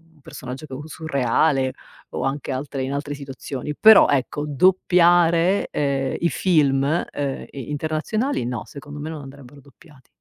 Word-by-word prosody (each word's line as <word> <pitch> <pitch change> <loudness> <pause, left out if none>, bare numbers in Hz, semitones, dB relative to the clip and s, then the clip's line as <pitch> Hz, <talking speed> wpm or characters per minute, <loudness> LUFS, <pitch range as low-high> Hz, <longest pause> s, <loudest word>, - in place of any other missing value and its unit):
un 150 - -25
personaggio 130 +2 -8
che 135 - -11
u 145 +3 -7
surreale, 140 -3 0 0.4
o - - -4
anche 135 +1 -3
altre 135 +1 -4
in 130 - -3
altre 145 +1 -3
situazioni. 140 0 -6
Però, 220 -2 +8
ecco, 145 +1 0
doppiare, 175 +3 +3
ehm, 135 -2 -1
i 170 - +2
film, 145 -8 +2 0.3
ehm, 140 -2 -4
i 135 -2 -8
internazionali 155 +6 -3
no, 125 - -1
secondo 145 +1 -10
me 155 - -5
non 155 - -7
andrebbero 140 0 -13
doppiati. 140 0 -21
145 Hz, 155 wpm, -22 LUFS, 135-160 Hz, 0.4 s, Però